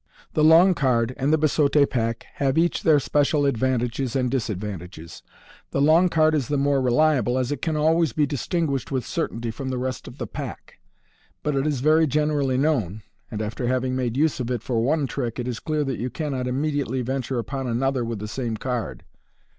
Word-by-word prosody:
The 155 - +2
long 165 +4 +7
card 125 -5 +1
and 135 +3 0
the 155 - +4
biseaule 150 -1 +3
pack 115 -2 -2
have 135 +1 +1
each 170 0 +2
their 155 -2 +4
special 145 +1 +1
ad 140 - +2
vantages 125 +1 -1
and 125 -2 0
disad 115 -7 -1
Fig. - - -8
35. 105 - -3
vantages. 85 -3 -10 0.5
The - - -2
long 160 +5 +5
card 155 -1 +3
is 140 -6 0
the 145 - 0
more 140 0 +2
reli 145 +5 +3
able, 125 +1 0
as 130 +1 -1
it 145 -2 -3
can 160 -2 -1
always 160 0 +2
be 150 +5 +1
distinguished 145 -1 -2
with 130 -2 -1
certainty 115 0 -3
from 130 +4 -5
the 130 - -2
rest 130 -1 -4
of - - -10
the - - -4
pack; - - -8 0.6
but 150 -1 0
it 135 +2 0
is 145 -5 -1
very 155 +2 +4
generally 145 -2 +1
known, 115 - 0 0.3
and 110 -2 -4
after 115 +3 -3
having 130 0 0
made 125 -1 -2
use 155 0 +1
of 125 -1 -3
it 120 -3 -2
for 120 -3 0
one 145 +4 +1
trick, 125 -3 -4
it 125 -1 -3
is 120 -2 -3
clear 155 -1 -1
that 135 -3 -3
you 125 +3 -2
cannot 135 -4 -3
immediately 135 -1 -1
venture 130 0 -2
upon 135 +2 -3
another 130 +2 0
with 115 -1 -3
the 105 +1 -6
same 115 -1 -3
card. 115 - -4
130 Hz, 215 wpm, -24 LUFS, 120-150 Hz, 0.6 s, long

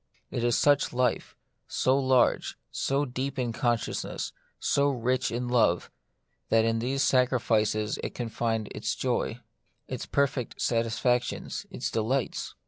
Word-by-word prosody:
It 120 - -2
is 120 -1 +3
such 145 -3 +3
life, 125 -1 0 0.3
so 130 - +2
large, 130 -2 +2
so 140 +2 0
deep 130 +2 -4
in 120 -3 -1
consciousness, 120 -1 -1 0.3
so 140 0 +2
rich 125 -1 0
in 120 +1 -2
love, 115 -8 +2 0.6
that 115 0 +4
in 115 0 +1
these 135 +4 0
sacrifices 110 -5 +2
it - - -4
can 120 - -3
find 110 -1 -1
its - - -2
joy, - - -1 0.5
its - - -5
perfect 140 -3 0
satisfactions, 120 +1 0
its - - -4
delights. 120 +4 -1
125 Hz, 135 wpm, -28 LUFS, 115-130 Hz, 0.6 s, that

